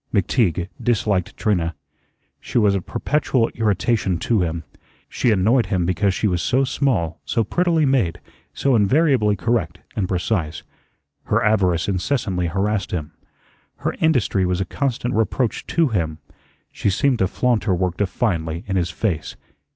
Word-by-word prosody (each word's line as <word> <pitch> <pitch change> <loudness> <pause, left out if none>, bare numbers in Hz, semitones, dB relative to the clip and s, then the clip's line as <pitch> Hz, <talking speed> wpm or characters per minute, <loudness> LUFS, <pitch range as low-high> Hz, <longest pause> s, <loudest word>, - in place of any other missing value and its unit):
McTeague 95 - +1
disliked 105 -6 0
Trina. 85 -7 0 0.6
She - - -4
was 105 -4 +4
a 100 - 0
perpetual 130 - 0
irritation 105 -3 0
to 110 +3 +1
him. 85 -1 -2 0.4
She 125 - 0
annoyed 110 +4 +3
him 90 -4 0
because 95 +3 +1
she 100 +3 0
was 90 -3 0
so 130 +2 +2
small, 110 - 0
so 115 - 0
prettily 165 - +1
made, 115 -12 +1 0.3
so 135 -2 +1
invariably 115 -1 +3
correct 100 -5 -1 0.2
and 100 -4 -1
precise. 90 -4 -1 0.6
Her - - +1
avarice 95 -6 +2
incessantly 95 -2 -1
harassed 100 +3 -1
him. 80 -5 -4 0.6
Her - - -2
industry 130 -11 +2
was 90 0 0
a 95 - 0
constant 125 -1 -2
reproach 115 +2 0
to 165 -3 +2
him. 80 -8 -1 0.5
She - - -1
seemed 125 +5 +1
to 95 - +3
flaunt 120 +3 0
her 95 -5 +2
work 90 -1 -1
defiantly 85 -5 -1
in 95 -1 -1
his 85 -1 0
face. 95 -9 -2
100 Hz, 150 wpm, -21 LUFS, 90-120 Hz, 0.6 s, was